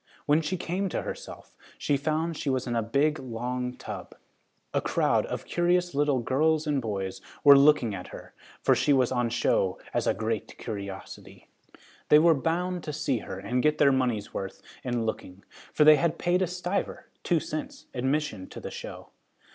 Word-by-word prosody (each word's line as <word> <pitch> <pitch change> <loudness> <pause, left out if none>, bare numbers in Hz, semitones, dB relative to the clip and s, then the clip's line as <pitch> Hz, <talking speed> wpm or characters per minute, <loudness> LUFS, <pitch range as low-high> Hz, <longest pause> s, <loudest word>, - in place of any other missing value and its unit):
When 150 +2 +4
she 175 +4 -2
came 185 +3 -2
to - - -2
herself, - - -8 0.2
she 145 - +1
found 155 +3 -1
she 145 - -3
was 130 -1 0
in 120 -2 -2
a 115 - +2
big 140 +7 +1
long 125 +1 -4
tub. - - -8 0.6
A - - +1
crowd - - +1
of - - -5
curious 175 0 +1
little 145 -1 +2
girls 155 +5 +2
and 145 -3 0
boys 95 -4 -4 0.2
were 140 -1 +10
looking 140 -6 +5
at 90 -2 -6
her, - - -11 0.3
for - - +5
she 145 - +3
was 130 -2 +3
on 120 -2 +1
show 95 -5 +1
as - - 0
a - - +2
great 110 0 -3
curiosity. 100 -4 -8 0.6
They 150 - +8
were 165 +2 +6
bound 175 +4 -1
to 150 - -4
see 140 -5 0
her 95 - -7
and 110 +6 -1
get 150 +2 +2
their 140 -2 +5
money's 125 -6 0
worth 95 0 -6 0.2
in 120 -3 -1
looking, 100 -3 -5 0.3
for - - +3
they 155 0 +8
had 170 0 0
paid 180 +1 +1
a 185 - +2
stiver 180 +2 -3
(two 170 -3 +2
cents) 155 0 -6
admission 130 -6 -1
to - - -8
the - - -7
show. - - -8
140 Hz, 185 wpm, -27 LUFS, 115-155 Hz, 0.6 s, were